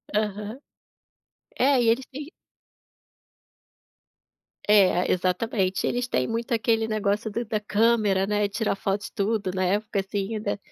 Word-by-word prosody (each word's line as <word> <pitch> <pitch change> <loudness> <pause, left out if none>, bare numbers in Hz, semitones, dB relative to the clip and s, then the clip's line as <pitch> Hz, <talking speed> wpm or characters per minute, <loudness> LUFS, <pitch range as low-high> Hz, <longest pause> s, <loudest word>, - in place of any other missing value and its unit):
Aham. 210 +3 -2 1.0
É 270 0 +4
e 230 - +2
eles 255 +3 0
têm 290 +3 -7 2.4
É, 190 -4 +4
exatamente, 185 +1 0
eles 245 0 -1
têm - - 0
muito 230 +2 -3
aquele 225 -1 +1
negócio 215 0 -1
do 230 +3 -3
da 215 -2 -2
câmera, 210 -2 +2
né, 210 0 +1
tirar 205 +2 -1
foto 195 +1 -1
de - - -7
tudo 200 -2 -1
na 185 0 0
época, 205 +2 0
assim, 195 +2 -3
ainda. 210 -1 -2
210 Hz, 135 wpm, -25 LUFS, 200-230 Hz, 2.4 s, É